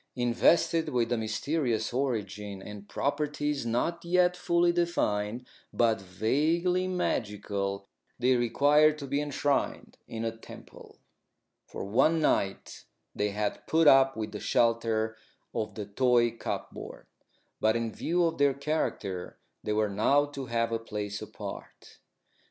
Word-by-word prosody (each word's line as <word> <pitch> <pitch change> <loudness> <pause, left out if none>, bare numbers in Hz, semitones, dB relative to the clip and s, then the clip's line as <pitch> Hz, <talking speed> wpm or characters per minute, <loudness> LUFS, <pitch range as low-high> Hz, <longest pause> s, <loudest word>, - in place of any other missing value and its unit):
Invested 130 +7 +2
with 120 -1 0
a 120 - +2
mysterious 115 +1 -1
origin 105 -6 -2
and 105 +1 -10
properties 145 -2 -1
not 145 +9 -1
yet 180 +1 +3
fully 175 -1 +2
defined, 125 -10 -1 0.3
but 115 -3 +2
vaguely 160 - +1
magical, 100 - -2 0.3
they 130 +1 +3
required 145 +6 +4
to 145 - -6
be 140 +2 -1
enshrined 145 -1 -1
in 115 0 -4
a 115 0 -2
temple. 115 - -13 0.7
For - - -6
one 155 +11 +3
night 100 -10 -1 0.3
they 105 0 0
had 105 0 -3
put 160 -1 +3
up 135 -2 +6
with 110 -1 -4
the 105 - -6
shelter 115 -1 +1 0.4
of 110 - -3
the 105 - -5
toy 120 +2 +3
cupboard. 115 - -6 0.5
But 110 +1 +3
in 115 -1 -1
view 175 +1 0
of 165 -2 -2
their 140 -1 +4
character 140 - -3 0.3
they 105 - -1
were 105 0 +2
now 110 +9 +3
to 140 -2 -7
have 115 0 0
a 115 - 0
place 105 -2 -5
apart. - - -9
120 Hz, 135 wpm, -29 LUFS, 110-150 Hz, 0.7 s, up